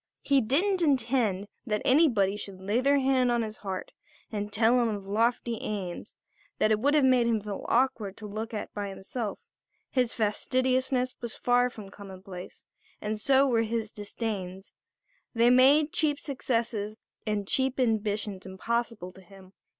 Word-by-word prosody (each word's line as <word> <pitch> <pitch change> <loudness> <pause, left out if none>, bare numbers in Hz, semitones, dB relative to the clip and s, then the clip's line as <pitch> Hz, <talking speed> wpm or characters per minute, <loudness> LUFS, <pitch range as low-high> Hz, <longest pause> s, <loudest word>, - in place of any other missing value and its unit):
He 275 -1 +3
didn't 355 - +2
intend 240 - +1 0.2
that 210 -1 -1
anybody 240 -9 +4
should 200 -2 -7
lay 205 +6 0
their 280 +2 +4
hand 260 -2 +2
on 235 -1 +1
his 215 -1 -6
heart 190 -2 -5 0.4
and 205 -1 -3
tell 225 +4 +4
him 235 - +2
of 205 -2 -4
lofty 230 +3 0
aims 190 -5 -5 0.4
that 215 - +2
it 215 - +3
would 285 +6 +2
have 295 - +4
made 250 -2 +4
him 230 -2 +2
feel 205 -1 -6
awkward 235 -5 +1
to 215 - -9
look 215 +3 -5
at 215 -2 -5
by 205 -1 -4
himself; 200 +3 -5 0.5
his 250 -3 +1
fastidiousness 255 +3 0
was 235 -2 -4
far 245 0 +2
from 215 -5 -10
commonplace, 190 -2 -10 0.3
and 215 0 -3
so 270 +2 +5
were 240 -4 +2
his 225 -1 -2
disdains; 200 -3 -5 0.6
they 235 +1 +5
made 280 +5 +5
cheap 295 -2 +1
successes 230 -6 -2 0.3
and 205 -2 -1
cheap 265 +2 0
ambitions 210 -4 0
impossible 215 +1 -3
to 190 - -16
him. 190 0 -16
225 Hz, 160 wpm, -28 LUFS, 205-255 Hz, 0.6 s, so